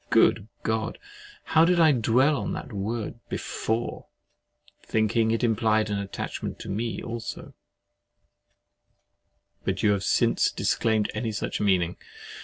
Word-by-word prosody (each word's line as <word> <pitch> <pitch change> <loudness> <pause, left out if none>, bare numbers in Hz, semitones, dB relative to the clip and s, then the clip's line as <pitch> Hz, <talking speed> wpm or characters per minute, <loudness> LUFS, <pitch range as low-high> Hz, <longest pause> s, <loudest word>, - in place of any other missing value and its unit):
Good 100 - +4 0.2
God! 110 0 -1 0.5
How 160 0 +4
did 175 +1 +4
I 160 -2 +7
dwell 130 +4 +3
on - - -3
that 130 - -6
word 110 +3 -3
BEFORE, 115 +2 -3 0.7
thinking 110 +1 +1
it 115 +2 0
implied 110 -2 +2
an 100 - 0
attachment 100 -1 -5
to - - -7
me 115 +4 -3
also; 115 0 -6 2.1
but 95 0 -2
you 105 - +5
have 100 -1 0
since - - +2
disclaimed 110 -2 +1
any 110 +1 -2
such 105 - -3
meaning. 90 -4 +2
110 Hz, 125 wpm, -26 LUFS, 105-120 Hz, 2.1 s, I